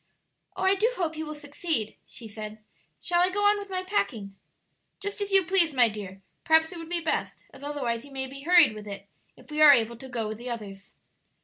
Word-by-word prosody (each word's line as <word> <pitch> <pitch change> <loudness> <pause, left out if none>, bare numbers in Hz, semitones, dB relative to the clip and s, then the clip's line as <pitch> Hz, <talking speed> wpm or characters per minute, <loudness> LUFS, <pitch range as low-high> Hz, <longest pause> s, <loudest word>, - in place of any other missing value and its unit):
"Oh, 375 - -2
I 380 +1 +5
do 430 +5 +2
hope 330 -6 -2
you 315 0 -5
will 305 - -6
succeed!" 290 -5 -3
she 230 - -10
said. 215 0 -7 0.4
"Shall 345 -1 +1
I 360 - +4
go 410 +2 0
on 410 0 +4
with 405 -1 -8
my 370 -1 -2
packing?" 225 - -2 0.6
"Just 405 +1 -5
as 405 0 -3
you 390 -2 +5
please, 340 -4 +3
my 245 -3 +5
dear; 195 -2 -8 0.2
perhaps 320 +1 +4
it 350 - -8
would 330 0 -9
be 345 -1 -1
best; 320 - -2
as 275 - -13
otherwise 260 -5 -2
you 285 - -13
may 265 -1 -3
be 275 +1 -9
hurried 340 -4 +6
with 210 -1 -9
it 200 0 -8 0.3
if 250 +4 -17
we 305 +1 -1
are 300 -1 +10
able 235 -2 +1
to 265 +2 -11
go 230 -3 -3
with 215 +1 -6
the 245 +1 -6
others." 200 -4 -8
290 Hz, 230 wpm, -27 LUFS, 225-355 Hz, 0.6 s, are